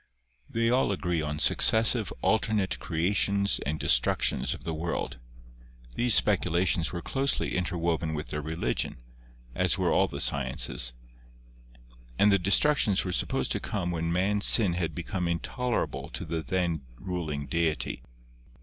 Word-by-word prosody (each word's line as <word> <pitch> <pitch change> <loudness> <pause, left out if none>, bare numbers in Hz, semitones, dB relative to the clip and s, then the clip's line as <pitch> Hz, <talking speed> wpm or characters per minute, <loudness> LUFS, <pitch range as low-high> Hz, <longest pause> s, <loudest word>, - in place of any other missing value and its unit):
They 115 0 0
all 125 -4 +2
agree 90 -4 -2
on 75 0 -4
successive 110 +5 +3
alternate 110 -3 0
creations 100 +4 0
and 75 +1 -2
destructions - - +1
of - - -14
the 80 - -3
world. 80 -3 -4 0.7
These 120 -3 +4
speculations 85 0 +2
were 85 -1 -6
closely 135 +1 -1
interwoven 85 -3 -1
with 75 - -6
their 75 - -3
religion, 80 -2 -3 0.6
as - - +1
were - - 0
all - - +3
the - - -7
sciences, 60 -2 0 1.2
and 105 - +4
the 100 - +3
destructions 100 - +3
were 90 - -3
supposed 65 -6 -1
to - - 0
come 90 -4 -3
when 85 0 -2
man's 100 +4 +1
sin 100 -7 +5
had 85 -3 -3
become 90 +1 -3
intolerable 120 +8 -3
to - - -6
the 80 -1 -3
then 85 -3 -2 0.2
ruling 80 -5 -4
deity. 80 +2 -2
90 Hz, 140 wpm, -27 LUFS, 80-100 Hz, 1.2 s, sin